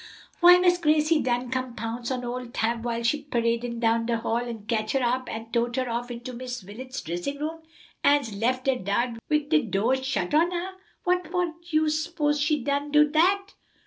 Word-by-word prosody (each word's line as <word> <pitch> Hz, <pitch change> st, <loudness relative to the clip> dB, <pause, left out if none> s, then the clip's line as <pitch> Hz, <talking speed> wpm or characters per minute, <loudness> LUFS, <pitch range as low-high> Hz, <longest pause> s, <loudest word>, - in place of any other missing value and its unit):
"Why, 355 Hz, +1 st, +9 dB
Miss 355 Hz, -1 st, +3 dB
Gracie 305 Hz, -1 st, +3 dB
done 245 Hz, 0 st, -1 dB
come 255 Hz, -2 st, -2 dB
pounce 230 Hz, +2 st, -4 dB
on 250 Hz, -2 st, -2 dB
ole 250 Hz, +1 st, -4 dB
Tab 230 Hz, 0 st, -1 dB
while 235 Hz, -1 st, -2 dB
she 290 Hz, +6 st, +1 dB
paradin' 235 Hz, -3 st, -1 dB
down 230 Hz, 0 st, +2 dB
de 235 Hz, -1 st, +1 dB
hall, 225 Hz, 0 st, -1 dB
and 235 Hz, -3 st, -5 dB
ketch 215 Hz, -2 st, -1 dB
her 270 Hz, -2 st, +1 dB
up 255 Hz, +1 st, 0 dB
an' 225 Hz, +1 st, -7 dB
tote 240 Hz, 0 st, 0 dB
her 255 Hz, -1 st, -1 dB
off 240 Hz, +1 st, -3 dB
into 240 Hz, +1 st, -7 dB
Miss 250 Hz, -2 st, -6 dB
Wilet's 255 Hz, +7 st, -7 dB
dressin' 175 Hz, -, -4 dB
room, 315 Hz, +3 st, -4 dB, 0.4 s
an's 285 Hz, -6 st, +3 dB
lef 255 Hz, +5 st, 0 dB
her 265 Hz, -2 st, +2 dB
dar 235 Hz, +4 st, -1 dB, 0.2 s
wid 300 Hz, -1 st, +1 dB
de 315 Hz, -1 st, +4 dB
do' 220 Hz, +3 st, 0 dB
shut 265 Hz, +2 st, -2 dB
on 325 Hz, +3 st, +4 dB
her. 360 Hz, +1 st, -3 dB, 0.3 s
What 360 Hz, -1 st, +1 dB
for 355 Hz, -1 st, -1 dB, 0.2 s
you 310 Hz, -1 st, +2 dB
s'pose 305 Hz, -1 st, 0 dB
she 300 Hz, -3 st, +1 dB
done 285 Hz, +2 st, -1 dB
do 300 Hz, 0 st, +6 dB
dat?" 385 Hz, +5 st, +2 dB
255 Hz, 200 wpm, -26 LUFS, 235-300 Hz, 0.4 s, Why